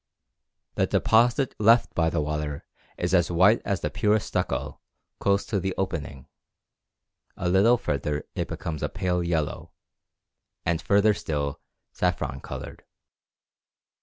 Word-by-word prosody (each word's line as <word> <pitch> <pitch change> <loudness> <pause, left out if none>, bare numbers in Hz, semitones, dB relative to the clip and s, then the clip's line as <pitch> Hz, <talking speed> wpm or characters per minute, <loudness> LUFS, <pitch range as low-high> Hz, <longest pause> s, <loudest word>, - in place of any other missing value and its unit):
The - - +1
deposit 120 +4 +3
left 115 +3 +4
by 80 -1 +2
the 80 -1 -1
water 75 -1 -3 0.3
is - - -2
as 90 -2 +3
white 95 +6 +4
as 100 -3 -1
the 75 - -2
purest 105 0 +1
stucco - - -2 0.4
close 100 0 +1
to 100 - -1
the 95 +1 -2
opening, 70 -8 -4 1.1
a 90 - -2
little 100 +7 +5
further 75 - -2
it - - -2
becomes 80 -3 -5
pale 90 -1 0
yellow, 80 -3 -2 0.9
and 85 -1 0
further 100 +1 +4
still 75 -6 -3 0.3
saffron 90 -7 -1
coloured. - - -8
90 Hz, 125 wpm, -26 LUFS, 75-100 Hz, 1.1 s, little